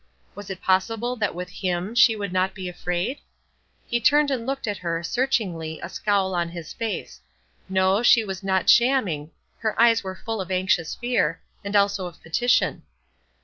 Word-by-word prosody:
Was 205 0 -10
it 190 -1 -7
possible 225 +6 +1
that 210 -5 -1
with 180 +1 -5
him 180 +2 -3
she 230 -1 +5
would 200 -3 -4
not 185 +1 0
be 190 -2 -5
afraid? 180 +7 -3 0.7
He 240 0 -1
turned 295 +2 +4
and 245 -3 -2
looked 275 0 -2
at 205 -2 -3
her, 170 -1 -2
searchingly, 185 -9 -1
a 170 - -5
scowl 195 0 0
on 170 -1 -1
his 170 -2 -8
face, 225 -5 -5 0.5
no, 190 +2 +2
she 235 -2 +5
was 190 -1 -5
not 190 -2 0
"shamming;" 210 - +3 0.3
her 220 -1 -2
eyes 230 -1 +5
were 190 -1 -5
full 225 +1 -4
of 185 - -7
anxious 185 -3 0
fear, 245 0 0 0.2
and 200 +1 -4
also 200 -2 +2
of 175 - -12
petition. 240 +10 +1
195 Hz, 175 wpm, -24 LUFS, 180-230 Hz, 0.7 s, she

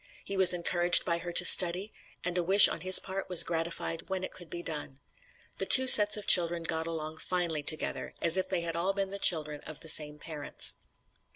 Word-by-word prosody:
He 200 - -7
was 190 -1 +3
encouraged 175 0 +1
by 170 0 -3
her 175 +1 -10
to 175 +1 +1
study, 185 +4 +3 0.3
and 180 0 -6
a 180 - -3
wish 195 +4 +7
on - - -8
his 185 +1 +7
part 190 0 -6
was 180 -2 +4
gratified 165 0 -7
when 190 -1 -6
it - - -8
could 175 -3 -15
be 175 0 -9
done. 145 -4 -8 0.6
The - - -5
two 260 - +6
sets 210 -4 +5
of 210 - -11
children 170 -1 +2
got 160 0 -6
along 160 -1 -9
finely 170 -3 -5
together, 155 +2 -4
as 170 - 0
if 185 - -2
they 170 -3 -5
all 170 +2 -5
had 195 - -4
been 195 -1 -5
the 200 - -8
children 150 -5 -1
of 155 - -12
the 160 - -6
same 150 -1 -1
parents." 150 -1 -2
170 Hz, 215 wpm, -26 LUFS, 160-185 Hz, 0.6 s, wish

